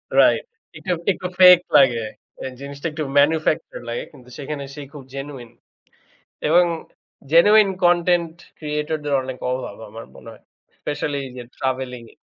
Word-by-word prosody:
Right - - +5 0.3
এটা 185 - -4 0.2
একটু 185 -1 -4
fake 180 -1 +9
লাগে। 120 -5 +4 0.4
এ - - -4 0.2
জিনিসটা 140 +3 -5
একটু 155 0 -4 0.2
manufactured 155 -2 +1
লাগে। 120 - -3
কিন্তু 125 -1 -17
সেখানে 145 0 -5
সে 145 - -8
খুব 145 -3 -9
genuine 135 -4 -7 1.0
এবং 175 +3 +6 0.7
genuine 205 +4 +6
content 175 -1 +3 0.2
creator 150 0 -2
দের 145 - 0
অনেক 130 -1 -6
অভাব 125 -5 -5
আমার 115 +2 -9
মনে - - -13
হয়। 110 - -17 0.4
Especially 145 -1 -3
এইযে 125 -1 -9
travelling 130 -2 -3
এ। - - -23
145 Hz, 140 wpm, -21 LUFS, 130-165 Hz, 1.0 s, fake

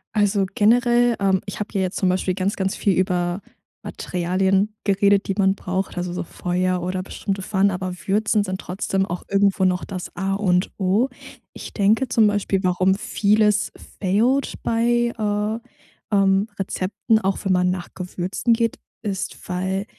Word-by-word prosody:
Also 205 -1 +2
generell, 240 +2 +4
ähm 195 -1 +2
ich 195 - -6
hab 210 - -4
hier 195 -3 0
jetzt 185 0 -2
zum 190 - +2
Beispiel 185 0 0
ganz, 195 +3 -1
ganz 190 -1 -1
viel 200 - +1
über 180 0 0 0.4
Materialien 190 +3 0
geredet, 200 0 +3
die 195 - -1
man 195 0 +3
braucht, 190 0 -3
also 175 0 -2
so 175 - -3
Feuer 180 +1 -1
oder 185 +1 -2
bestimmte 195 0 -4
Pfannen, 200 +1 +2
aber 185 -1 -3
würzen 210 +1 +2
sind 185 -1 -4
trotzdem 190 +1 -1
auch 175 0 -5
irgendwo 200 -1 +2
noch 180 -1 +1
das 185 -2 -6
A 195 +2 -1
und 185 -2 +1
O. 200 +6 +2 0.5
Ich - - -9
denke 215 +5 +2
zum 225 -2 +4
Beispiel, 205 -1 0
warum 185 +1 +2
vieles 210 +1 +2 0.3
failed 230 +8 +1
bei, 235 +1 +1
äh, 210 +1 -1 0.6
ähm, 195 +1 +3
Rezepten, 200 +3 0
auch 195 -2 0
wenn 190 - +3
man 180 0 +2
nach 180 -1 -3
Gewürzen 185 +5 -1
geht, 230 0 0 0.3
ist 195 -4 -3
weil 190 +2 -2
195 Hz, 160 wpm, -22 LUFS, 185-210 Hz, 0.6 s, generell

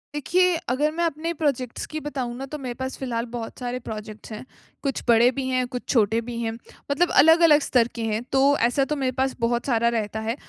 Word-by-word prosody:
देखिए, 360 +4 +2
अगर 290 +5 +1
मैं 340 +2 -2
अपने 330 +2 -2
प्रोजेक्ट्स 275 -6 -2
की 310 - -5
बताऊँ 265 -5 -4
ना, 270 - -5
तो 300 +3 -6
मेरे 255 -4 -5
पास 260 +1 -5
फिलहाल 235 -3 -3
बहुत 230 -2 -6
सारे 250 0 -3
प्रोजेक्ट्स 215 -1 -8
हैं। 215 - -7 0.4
कुछ 275 -2 -1
बड़े 235 +1 +6
भी 265 0 -3
हैं, 255 -1 +1
कुछ 245 0 -6
छोटे 225 -1 +2
भी 235 0 -6
हैं। 225 -1 -1 0.4
मतलब 345 +5 +2
अलग-अलग 325 -1 +6
स्तर 240 -4 +2
के 235 - -4
हैं, 220 0 -1
तो 275 +1 +4
ऐसा 270 +2 +1
तो 300 - -2
मेरे 265 -3 -1
पास 265 0 0
बहुत 235 +1 0
सारा 235 -3 +2
रहता 215 0 -3
है। 230 - 0
255 Hz, 215 wpm, -24 LUFS, 235-290 Hz, 0.4 s, बड़े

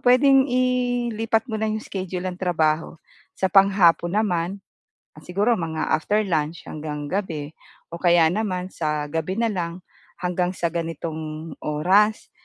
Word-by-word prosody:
puwedeng 265 +2 +5
ilipat 245 -3 +1
mo 220 - -2
na 220 - 0
'yong 215 0 -2
schedule 185 -1 -5
ng 180 - -10
trabaho, 165 -3 0 0.4
sa 190 - 0
panghapon 190 -3 +4
naman, 195 -2 0 0.6
siguro 200 +7 0
mga 160 -1 -2
after 210 +7 +2
lunch 160 -3 -1
hanggang 150 -1 -6
gabi 160 -7 -3 0.4
o 170 - -6
kaya 170 -2 +5
naman 185 -2 -2
sa 150 -2 -2
gabi 165 +4 -2
na 230 0 +1
lang, 175 -1 -4 0.4
hanggang 180 0 0
sa 170 -2 -1
ganitong 160 -1 -5
oras. 190 +8 +2
180 Hz, 135 wpm, -23 LUFS, 165-215 Hz, 0.6 s, puwedeng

